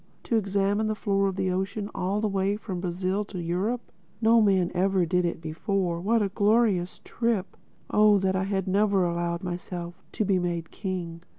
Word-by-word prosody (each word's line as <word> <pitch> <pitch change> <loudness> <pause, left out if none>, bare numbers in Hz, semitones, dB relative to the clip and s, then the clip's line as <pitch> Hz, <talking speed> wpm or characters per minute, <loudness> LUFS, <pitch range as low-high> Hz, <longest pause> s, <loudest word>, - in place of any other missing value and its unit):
To 235 - -1
examine 200 0 +1
the 215 - -1
floor 195 -1 +1
of 190 - -2
the 190 -1 0
ocean 195 +3 -2
all 195 +3 -1
the 215 - +1
way 195 0 0
from 195 -4 -5
Brazil 185 +3 -1
to 195 -2 -7
Europe! 185 +8 -2 0.3
No 225 0 +5
man 190 -4 +3
ever 185 0 +2
did 180 +2 +1
it 170 - -2
before. 170 +2 -2
What 220 +3 +2
a 200 - 0
glorious 205 -3 +2
trip!—Oh 210 -1 +1
that 190 -1 +1
I 190 0 0
had 195 -1 -1
never 200 -1 +3
allowed 170 +1 -2
myself 175 0 -5
to 215 - 0
be 190 -2 +2
made 170 -2 -3
king! 175 -4 -5
190 Hz, 180 wpm, -27 LUFS, 180-205 Hz, 0.3 s, No